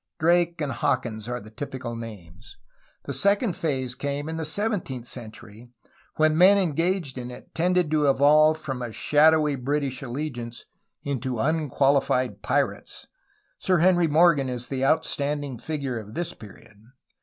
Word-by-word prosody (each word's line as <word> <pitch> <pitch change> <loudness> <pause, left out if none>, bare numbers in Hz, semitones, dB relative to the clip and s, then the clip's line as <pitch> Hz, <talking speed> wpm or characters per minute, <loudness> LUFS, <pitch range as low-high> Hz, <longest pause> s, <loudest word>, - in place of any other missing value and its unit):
> - - -60
Drake 170 +1 +2
and 145 -2 -1
Hawkins 115 -1 -2
are 125 0 -3
the 110 -1 -13
typical 130 -1 -6
names. 100 -5 -10 0.5
The 140 - -4
second 200 - +2
phase 130 -6 -2
came 140 +3 -4
in 160 0 -4
the 160 - -3
seventeenth 165 - -2
century, 115 0 -9 0.5
when 155 0 +3
the 155 - -1
men 190 +4 +7
engaged 170 -5 0
in 125 0 -6
it 125 - -12
tended 180 -1 +1
to 150 -2 +3
evolve 150 +3 +5
from 135 -5 -5
a 120 -2 -4
shadowy 150 +3 +3
British 135 0 -2
allegiance 120 -3 -6 0.4
into 130 -3 -3
unqualified 135 -2 +1
pirates. - - -2 0.5
Sir 185 -1 +2
Henry 175 0 +4
Morgan 155 -3 +4
is 125 -1 -5
the 135 -1 -2
outstanding 145 -3 0
figure 140 -6 -3
of 105 0 -11
this 175 -1 -2
period. 105 0 -15
140 Hz, 150 wpm, -25 LUFS, 125-160 Hz, 0.5 s, men